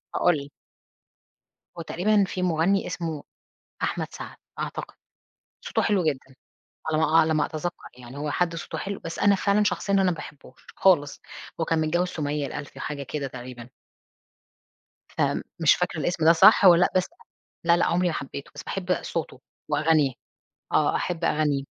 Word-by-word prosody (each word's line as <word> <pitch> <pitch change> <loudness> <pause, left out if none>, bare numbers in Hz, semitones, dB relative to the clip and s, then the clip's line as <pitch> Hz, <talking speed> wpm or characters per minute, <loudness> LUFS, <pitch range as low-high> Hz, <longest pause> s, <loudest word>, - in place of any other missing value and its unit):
هاقول 175 -3 +3
لِك 140 0 -8 1.3
هو - - -4
تقريبًا 200 +5 +2
في 185 - -4
مُغني 180 +3 +1
اسمه 160 -4 -4 0.6
أحمد - - -1
سعد، - - -8 0.2
أعتقد، - - -5 0.7
صوته - - -1
حلو 200 -4 +1
جدًا، 135 -3 -2 0.6
على 155 - +1
ما 160 - +2
أع 160 +2 +3
على 160 0 +3
ما 155 - +2
أتذكّر 170 +3 -4 0.2
يعني، 125 +2 -11
هو 150 0 -3
حد 170 -2 0
صوته 165 - -6
حلو 200 0 -4
بس 165 - -7
أنا 200 -1 +5
فعلًا 200 +2 +2
شخصيًا 200 -1 -1
أنا 195 -1 +4
ما 185 - +3
باحبوش 145 -5 -10
خالص. 150 -7 +3 0.4
هو - - +1
كان 160 -1 +1
متجوِّز 175 +3 +1
سُمية 145 -3 -2
الألفي، 145 - -8
حاجة 145 -2 -4
كده 140 0 -4
تقريبًا 125 -1 -9 1.4
فمش - - +1
فاكرة - - -2
الإسم 175 -2 -1
ده 165 - +8
صح 200 +5 +7
والّا 175 -1 +8
لأ، - - +4
بس 185 - +3 0.6
لأ، 170 0 +5
لأ، - - +2
عمري 180 +1 +1
ما 170 - 0
حبيته، 140 0 -6
بس - - -7
باحب 185 -1 -2
صوته 155 -6 -4 0.3
وأغانيه. 150 -2 +3 0.6
آه، - - +2
أحب 170 -1 -2
أغانيه. 150 -3 +1
160 Hz, 165 wpm, -25 LUFS, 145-180 Hz, 1.4 s, ده